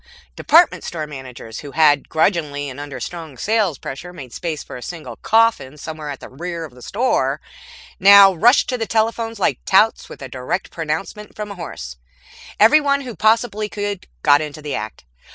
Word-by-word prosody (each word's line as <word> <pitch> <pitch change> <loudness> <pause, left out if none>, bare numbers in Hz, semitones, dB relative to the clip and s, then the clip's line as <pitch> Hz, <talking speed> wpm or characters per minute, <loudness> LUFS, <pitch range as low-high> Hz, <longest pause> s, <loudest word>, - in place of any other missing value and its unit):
Department 335 +3 +4
store 160 -3 -4
managers 130 -6 -9
who 145 -2 -9
had, 150 -3 +3
grudgingly 155 -4 0
and 130 - -10
under 145 -3 -7
strong 160 0 -7
sales 205 - 0
pressure, 170 +7 -7
made 135 -9 -11
space 160 -4 -4
for - - -10
a 125 - -8
single 165 +5 -7
coffin 220 -12 +2
somewhere 155 0 -7
at 140 - -7
the - - -9
rear 170 +4 -6
of 150 - -13
the 125 - -16
store, 240 - 0 0.6
now 195 0 +8
rushed 235 - +4
to 250 -2 -2
the 225 - -2
telephones 225 0 0
like - - +1
touts 215 +4 +3
with - - -10
a - - -5
direct 130 +8 -4
pronouncement 180 +6 -5
from 210 -1 -6
a - - -7
horse. 60 - -8 0.6
Everyone 280 +5 +5
who 250 -5 -7
possibly 220 -1 +1
could 205 -2 -4 0.2
got 145 0 +5
into 150 -1 -6
the 150 - -4
act. 110 - -6
170 Hz, 180 wpm, -20 LUFS, 145-215 Hz, 0.6 s, now